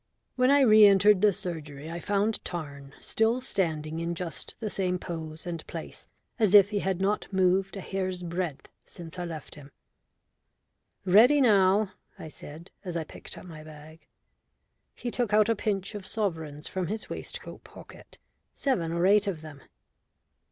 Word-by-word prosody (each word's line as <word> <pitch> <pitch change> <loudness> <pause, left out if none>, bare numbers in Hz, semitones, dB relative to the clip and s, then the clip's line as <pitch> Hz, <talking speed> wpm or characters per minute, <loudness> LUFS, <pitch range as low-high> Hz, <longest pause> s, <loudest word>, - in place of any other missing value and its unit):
When 255 0 +3
I 285 0 +5
re 215 -4 +7
entered 200 0 +5
the 210 - +5
surgery 160 -6 -6
I 170 - -5
found 205 +3 0
Tarn 140 -5 -7
still 225 +3 +1
standing 160 - -2
in 170 +1 -2
just 170 -1 -5
the 215 -3 -4
same 180 -2 0
pose 160 -3 -7
and 170 -2 -5
place, - - -8 0.3
as 210 -3 +4
if 200 0 +7
he 205 - 0
had 190 -2 -1
not 200 +2 -1
moved 190 +1 +1
a - - -5
hair's 185 -1 -3
breadth 170 -4 -4 0.2
since 170 0 -10
I 175 - -3
left 160 -3 -8
him. 145 -1 -13 1.3
"Ready 225 +10 +6
now," 200 -4 +4 0.3
I 160 - -8
said, 155 +3 -12
as 175 -3 -4
I 165 - -2
picked - - -8
up - - -11
my 160 -3 -10
bag. 155 +1 -14 0.9
He 240 - -5
took 235 -4 0
out 215 +1 +4
a 230 - +3
pinch 200 -1 -2
of 200 -3 -7
sovereigns 160 -9 -3
from 185 -2 -3
his 215 +4 -4
waistcoat - - -7
pocket, - - -14 0.4
seven 180 -13 0
or 170 +1 +1
eight 205 +1 +4
of 175 -6 -3
them. 150 -3 -11
185 Hz, 165 wpm, -28 LUFS, 160-210 Hz, 1.3 s, re